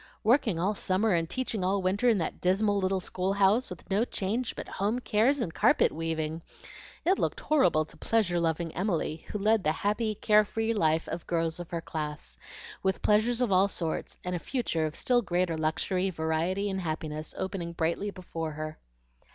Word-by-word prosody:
Working 225 Hz, -, +3 dB
all 190 Hz, +5 st, +1 dB
summer 200 Hz, +2 st, +1 dB
and 165 Hz, -1 st, 0 dB
teaching 230 Hz, -3 st, -2 dB
all 190 Hz, +1 st, +1 dB
winter 200 Hz, +6 st, +2 dB
in 225 Hz, -, +4 dB
that 165 Hz, -, -3 dB
dismal 200 Hz, +3 st, +2 dB
little 190 Hz, 0 st, 0 dB
school 185 Hz, +2 st, -1 dB
house, 200 Hz, +5 st, +3 dB
with 180 Hz, -, -10 dB
no 205 Hz, +4 st, +3 dB
change 225 Hz, +2 st, -2 dB
but -, -, -6 dB
home 205 Hz, +5 st, -1 dB
cares 250 Hz, +3 st, +2 dB
and 180 Hz, -9 st, -2 dB
carpet -, -, +4 dB
weaving! 160 Hz, 0 st, -3 dB, 0.6 s
It 375 Hz, +3 st, +3 dB
looked -, -, -1 dB
horrible 180 Hz, -, +3 dB
to -, -, -15 dB
pleasure 200 Hz, -7 st, +1 dB
loving 165 Hz, 0 st, -1 dB
Emily, 170 Hz, -4 st, -1 dB
who -, -, -3 dB
led 215 Hz, 0 st, +2 dB
the 155 Hz, -, +3 dB
happy, 210 Hz, +5 st, -1 dB
care 210 Hz, +1 st, +4 dB
free 225 Hz, +2 st, -1 dB
life 160 Hz, -5 st, +1 dB
of 170 Hz, -, -5 dB
girls 165 Hz, -1 st, -1 dB
of 175 Hz, -, -7 dB
her 170 Hz, -1 st, -3 dB
class, 150 Hz, -, -5 dB, 0.5 s
with 190 Hz, 0 st, -1 dB
pleasures 230 Hz, +4 st, +3 dB
of 245 Hz, -5 st, +1 dB
all 190 Hz, +1 st, +5 dB
sorts, 165 Hz, -5 st, -3 dB
and 180 Hz, 0 st, -2 dB
a -, -, -2 dB
future 165 Hz, -, -1 dB
of 155 Hz, -, -7 dB
still 245 Hz, -1 st, +2 dB
greater 180 Hz, -4 st, 0 dB
luxury, 180 Hz, +4 st, 0 dB
variety, 165 Hz, +4 st, -1 dB
and 190 Hz, -1 st, -2 dB
happiness, 155 Hz, -2 st, -4 dB
opening 190 Hz, -3 st, -3 dB
brightly 170 Hz, +5 st, -1 dB
before 165 Hz, -5 st, -5 dB
her. 155 Hz, +1 st, -6 dB
185 Hz, 185 wpm, -29 LUFS, 165-210 Hz, 0.6 s, all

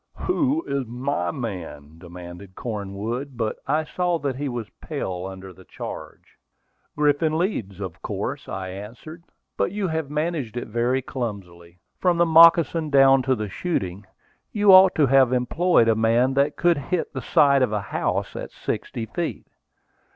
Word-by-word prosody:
Who 315 Hz, -3 st, 0 dB
is 140 Hz, -3 st, -2 dB
my 125 Hz, -6 st, -2 dB
man?" 85 Hz, -, -7 dB
demanded 90 Hz, +2 st, -11 dB
Cornwood. 115 Hz, +5 st, -5 dB
But 110 Hz, -2 st, -2 dB
I 155 Hz, +3 st, +1 dB
saw 175 Hz, +2 st, -1 dB
that 140 Hz, -4 st, -3 dB
he 145 Hz, 0 st, -3 dB
was 120 Hz, -3 st, -5 dB
pale 90 Hz, 0 st, -4 dB
under 95 Hz, 0 st, -10 dB
the 95 Hz, +2 st, -16 dB
charge. -, -, -9 dB, 0.6 s
"Griffin 150 Hz, +2 st, +2 dB
Leeds, 115 Hz, -, -2 dB
of 95 Hz, -4 st, -7 dB
course," -, -, -4 dB
I 95 Hz, -1 st, -5 dB
answered. 115 Hz, -, -9 dB, 0.4 s
"But -, -, 0 dB
you 205 Hz, -1 st, -2 dB
have 160 Hz, -3 st, -3 dB
managed 150 Hz, -6 st, -2 dB
it 120 Hz, -, -5 dB
very 120 Hz, +4 st, 0 dB
clumsily, 90 Hz, -9 st, -7 dB, 0.2 s
from 180 Hz, -2 st, +2 dB
the 170 Hz, -, +4 dB
moccasin 165 Hz, -1 st, +6 dB
down 135 Hz, -1 st, +6 dB
to 130 Hz, +1 st, +1 dB
the 105 Hz, -2 st, -4 dB
shooting. 95 Hz, -, -3 dB, 0.4 s
You 205 Hz, -2 st, +4 dB
ought 185 Hz, 0 st, +8 dB
to 150 Hz, -, +4 dB
have 135 Hz, -2 st, +4 dB
employed 125 Hz, +2 st, +2 dB
a 115 Hz, -, +5 dB
man 115 Hz, +4 st, +2 dB
that 140 Hz, +1 st, +1 dB
could 170 Hz, -3 st, +2 dB
hit 160 Hz, +5 st, -3 dB
the 130 Hz, -, -4 dB
side 140 Hz, 0 st, +4 dB
of 125 Hz, -4 st, +2 dB
a 105 Hz, -, 0 dB
house -, -, -1 dB
at -, -, -6 dB
sixty 115 Hz, -, -4 dB
feet." 160 Hz, +10 st, -4 dB
130 Hz, 160 wpm, -23 LUFS, 100-160 Hz, 0.6 s, ought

